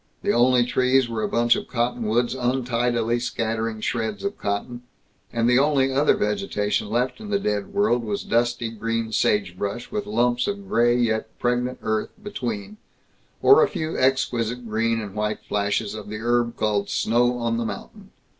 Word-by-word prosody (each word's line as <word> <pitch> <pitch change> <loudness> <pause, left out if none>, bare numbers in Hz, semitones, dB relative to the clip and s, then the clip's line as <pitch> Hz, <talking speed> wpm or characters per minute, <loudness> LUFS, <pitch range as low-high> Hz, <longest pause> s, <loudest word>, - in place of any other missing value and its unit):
The - - +2
only 120 0 +4
trees 130 +1 +2
were 115 -2 -3
a - - -1
bunch 120 0 +3
of - - -5
cottonwoods 120 0 0
untidily 120 -2 0
scattering 115 -2 -2
shreds 110 - -2
of 200 0 -2
cotton, 105 +4 -3 0.5
and 115 0 +1
the 125 +1 +5
only 135 -2 +2
other 140 +7 +4
vegetation 195 - -1
left 125 - -1
in 215 -1 -8
the 205 - +2
dead 105 - -2
world 200 - +2
was 105 -2 -3
dusty 120 0 0
green 115 0 -2
sagebrush 100 +2 -1
with 210 -1 -3
lumps 125 - +1
of 200 -1 -4
gray 120 -5 +3
yet 110 -2 -1
pregnant 125 +1 0
earth 110 -1 -1
between, 205 0 -5 0.7
or 415 +4 +8
a 450 - +4
few 160 +1 -3
exquisite 125 -2 0
green 115 +1 0
and 105 -3 -6
white 105 0 -2
flashes 100 +1 -1
of 105 -1 -8
the 105 - -4
herb 120 +1 0
called 105 -2 0
Snow 120 +2 +2
on 115 -1 -1
the 115 - -1
Mountain. - - -8
120 Hz, 165 wpm, -24 LUFS, 110-130 Hz, 0.7 s, or